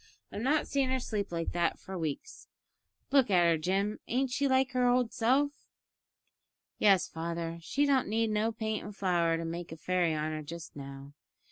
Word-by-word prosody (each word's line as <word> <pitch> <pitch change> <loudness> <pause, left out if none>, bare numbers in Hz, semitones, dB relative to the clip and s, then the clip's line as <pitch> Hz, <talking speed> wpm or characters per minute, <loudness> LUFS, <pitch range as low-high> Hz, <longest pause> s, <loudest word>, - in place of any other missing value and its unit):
I've 205 - -5
not 290 +5 +2
seen 275 -2 +1
her 260 0 +1
sleep 210 -6 -3
like 165 -1 -2
that 170 -1 0
for 190 - -8
weeks. 160 -5 -5 0.6
Look 270 -5 +4
at 180 -3 +5
her, 170 -1 +4
Jim; 195 +5 0
ain't 260 +1 0
she 280 +2 +1
like 260 0 +2
her 250 -1 +2
old 245 -1 +2
self?" 265 +5 +2 1.3
"Yes, 195 -3 +5
father, 165 0 -4
she 280 - +1
don't 275 -2 +2
need 220 +1 +1
no 215 +2 +1
paint 220 -1 -3
and 205 -1 -8
flour 170 -4 +1
to 165 - -4
make 170 +1 -5
a 165 - -7
fairy 175 -1 +1
on 155 +1 -2
her 155 0 -4
just 160 +1 -9
now. 140 0 -9
195 Hz, 190 wpm, -31 LUFS, 165-250 Hz, 1.3 s, at